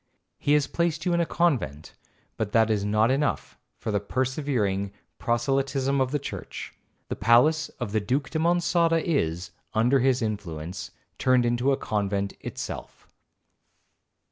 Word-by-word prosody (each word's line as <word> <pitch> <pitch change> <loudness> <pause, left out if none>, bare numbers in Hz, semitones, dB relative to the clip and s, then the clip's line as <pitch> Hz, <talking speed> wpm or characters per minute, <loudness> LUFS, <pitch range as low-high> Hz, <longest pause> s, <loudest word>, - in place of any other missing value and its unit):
He 145 - +2
has 150 -1 +4
placed 170 -2 -1
you 180 - +2
in 170 - +2
a 170 - +1
convent, 115 - 0 0.4
but 105 -2 -3
that 115 -1 +4
is 105 -2 +1
not 110 +3 +3
enough 140 +2 -1 0.2
for - - -3
the 100 - +1
persevering 115 -4 -1 0.3
proselytism 135 +3 +1
of 130 - +1
the 145 - 0
church. 140 - -7 0.4
The - - -2
palace 150 +9 +4
of 120 -5 -3
the 110 - +2
Duke 130 +7 -1
de 160 - -1
Monçada 170 0 +3
is, 90 - -1 0.2
under 120 +5 +4
his 130 -1 +2
influence, 90 -5 -4 0.3
turned 130 -2 +4
into 120 +3 +2
a 135 - +2
convent 100 -1 -1
itself. - - -7
125 Hz, 145 wpm, -26 LUFS, 105-145 Hz, 0.4 s, has